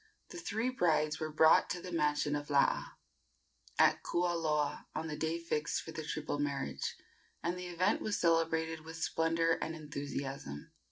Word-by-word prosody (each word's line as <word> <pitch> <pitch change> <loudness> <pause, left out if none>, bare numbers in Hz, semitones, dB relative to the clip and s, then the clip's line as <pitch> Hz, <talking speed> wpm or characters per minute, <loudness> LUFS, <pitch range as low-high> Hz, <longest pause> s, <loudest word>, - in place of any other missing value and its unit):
The 350 - -7
three 230 -5 -1
brides 155 -9 +2
were 155 -1 -3
brought 160 +1 +6
to 180 - -2
the 180 +1 -7
mansion 150 -2 +1
of 145 0 -4
Laa, 140 -1 +2 0.8
at - - +5
Kualoa, 160 -4 0
on 160 - -2
the 150 - -3
day 160 +2 -1
fixed 155 -3 -1
for 160 - -8
the 160 - -5
triple 150 -1 -3
marriage, 140 -1 -2 0.5
and 170 +1 0
the 180 0 -6
event 180 +4 +1
was 215 -2 -1
celebrated 160 -1 +2
with 160 +1 -8
splendor 165 0 +1
and 160 - -3
enthusiasm. 140 - -5
160 Hz, 160 wpm, -34 LUFS, 150-170 Hz, 0.8 s, brought